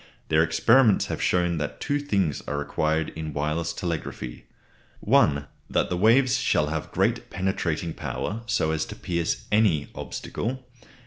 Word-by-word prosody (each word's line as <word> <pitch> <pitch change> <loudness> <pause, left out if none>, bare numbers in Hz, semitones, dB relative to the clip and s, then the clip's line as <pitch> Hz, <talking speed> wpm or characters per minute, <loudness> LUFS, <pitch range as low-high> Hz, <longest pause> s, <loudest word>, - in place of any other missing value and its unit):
Their 80 0 +4
experiments 110 +8 +4
have - - -4
shown 90 -2 +1
that 75 - -4
two 145 0 0
things 100 - 0
are 75 - -2
required 80 +2 0
in 80 -1 -6
wireless 75 +3 -1
telegraphy 80 -8 -5 0.6
(i.) 70 -1 +4 0.3
That - - 0
the - - +1
waves 115 +7 +4
shall 75 -1 +2
have 80 -1 -4
great - - 0
penetrating 90 -4 -2
power, 110 +7 -4
so 80 -9 +1
as 80 -1 0
to - - -8
pierce 85 +7 -2
any 105 -9 +3
obstacle. 130 +2 -5
85 Hz, 145 wpm, -25 LUFS, 75-105 Hz, 0.6 s, Their